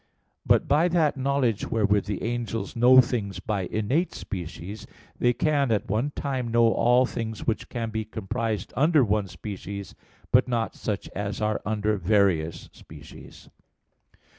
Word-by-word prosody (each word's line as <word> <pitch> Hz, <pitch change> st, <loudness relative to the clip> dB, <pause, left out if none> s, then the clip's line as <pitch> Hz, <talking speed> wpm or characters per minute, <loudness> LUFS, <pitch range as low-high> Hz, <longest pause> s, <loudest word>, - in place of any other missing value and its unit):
But -, -, +4 dB
by 150 Hz, +5 st, +4 dB
that 165 Hz, -4 st, +2 dB
knowledge 135 Hz, -5 st, 0 dB
wherewith 105 Hz, -2 st, +2 dB
the 105 Hz, -1 st, -4 dB
angels 115 Hz, 0 st, -3 dB
know 125 Hz, +2 st, +7 dB
things 105 Hz, -7 st, -3 dB
by 95 Hz, -1 st, -2 dB
innate 130 Hz, -, -1 dB
species, 95 Hz, +3 st, -7 dB, 0.3 s
they 120 Hz, -, +4 dB
can 140 Hz, 0 st, +1 dB
at 105 Hz, -, 0 dB
one 115 Hz, +7 st, 0 dB
time 130 Hz, -4 st, -2 dB
know 115 Hz, 0 st, +3 dB
all 125 Hz, +2 st, +4 dB
things 110 Hz, -4 st, -5 dB
which 115 Hz, -, -2 dB
can 115 Hz, -3 st, -4 dB
be 110 Hz, 0 st, -2 dB
comprised 110 Hz, -1 st, -4 dB
under 150 Hz, +1 st, +4 dB
one 105 Hz, -1 st, 0 dB
species; 100 Hz, +2 st, -7 dB, 0.4 s
but 125 Hz, +1 st, +5 dB
not 115 Hz, -4 st, -1 dB
such 105 Hz, -2 st, -4 dB
as 100 Hz, 0 st, -4 dB
are 110 Hz, 0 st, -1 dB
under 105 Hz, 0 st, 0 dB
various 90 Hz, -4 st, +1 dB
species. -, -, -14 dB
110 Hz, 145 wpm, -26 LUFS, 100-125 Hz, 0.4 s, know